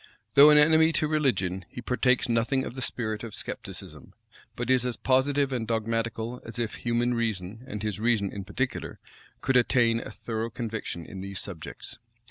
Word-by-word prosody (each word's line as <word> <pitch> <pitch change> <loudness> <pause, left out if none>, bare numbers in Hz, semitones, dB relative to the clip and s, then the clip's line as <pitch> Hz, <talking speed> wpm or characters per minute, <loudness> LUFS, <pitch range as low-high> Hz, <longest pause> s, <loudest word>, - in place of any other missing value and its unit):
Though 145 +2 +9
an 150 - +7
enemy 160 +2 +6
to 155 - +1
religion, 100 - +1
he - - -8
partakes 125 +1 +1
nothing 120 +3 +1
of - - -6
the 130 - -6
spirit 110 -4 -3
of 115 -3 -7
scepticism; - - -7 0.4
but 120 +2 -1
is 130 -1 +4
as 125 -2 -2
positive 135 +1 +2
and 115 -3 -2
dogmatical 115 +1 -2
as 115 - -9
if 115 -2 -2
human 120 +1 0
reason, 110 -2 -2
and 105 -4 -5
his 105 -1 -2
reason 110 -4 +1
in 100 - -5
particular, 120 +6 -3 0.4
could 130 0 +3
attain 120 -2 +3
a - - -7
thorough 110 +1 -4
conviction 110 -7 -5
in 95 - -8
these 100 -1 -5
subjects. 95 +4 -8
115 Hz, 175 wpm, -27 LUFS, 110-130 Hz, 0.4 s, Though